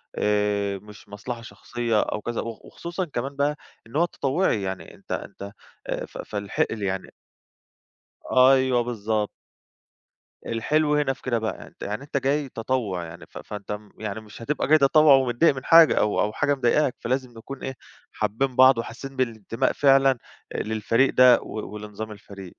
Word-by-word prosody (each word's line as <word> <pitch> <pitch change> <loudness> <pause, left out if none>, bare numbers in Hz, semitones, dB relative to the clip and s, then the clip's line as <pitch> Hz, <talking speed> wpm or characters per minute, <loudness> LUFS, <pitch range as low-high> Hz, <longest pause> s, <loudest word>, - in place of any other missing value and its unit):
آآ 105 -1 0
مش 105 0 -15
مصلحة 115 +3 -6
شخصية 120 -1 -2
أو 105 - -3
كذا. 120 +1 -3
وخ 115 -1 -8
وخصوصًا 175 +2 -5
كمان 140 -1 -4
بقى 145 +1 +1 0.3
إن 120 - -13
هو 170 +3 +4
تطوُّعي، 140 - 0
يعني 95 -1 -5
أنت - - -15
أنت 100 +1 -5 0.4
آآ - - -3
ف - - -12
فالحقل 105 +1 -2
يعني 95 -1 -3 1.2
أيوه، 130 -1 +5
بالضبط. 110 -3 -1 1.2
الحلو 150 +6 +1
هنا 145 -2 +1
في - - -20
كده 120 -3 0
بقى، 110 0 -4
أنت - - -21
يعني 105 +6 -4
أنت 140 0 -3
جاي 140 +1 0
تطوُّع، 115 -7 -2
يعني 85 0 -10
ف - - -11
فأنت 105 -1 -7
م 105 0 -6
يعني 110 0 -4
مش 110 +1 -13
هتبقى 145 +6 -1
جاي 155 +1 +6
تطوّع 145 0 +6
ومتضايق 130 +3 +3
من 130 - -7
حاجة، 165 -1 +7
أو 105 - +2
أو 105 +1 0
حاجة 145 0 +1
مضايقاك، 130 +1 +2
فلازم 130 +1 -2
نكون 135 +4 -9
إيه، 130 -1 -4 0.4
حابّين 130 +4 -1
بعض 130 -1 +7
وحاسّين 130 +4 -6
بالانتماء 115 0 -1
فعلًا 135 -2 +4 0.4
آآ - - -1
للفريق 110 +4 +1
ده، 125 -1 +7
و 105 -1 -7
ولنظام 105 +1 -7
الفريق. 100 -3 -11
120 Hz, 165 wpm, -25 LUFS, 105-135 Hz, 1.2 s, حاجة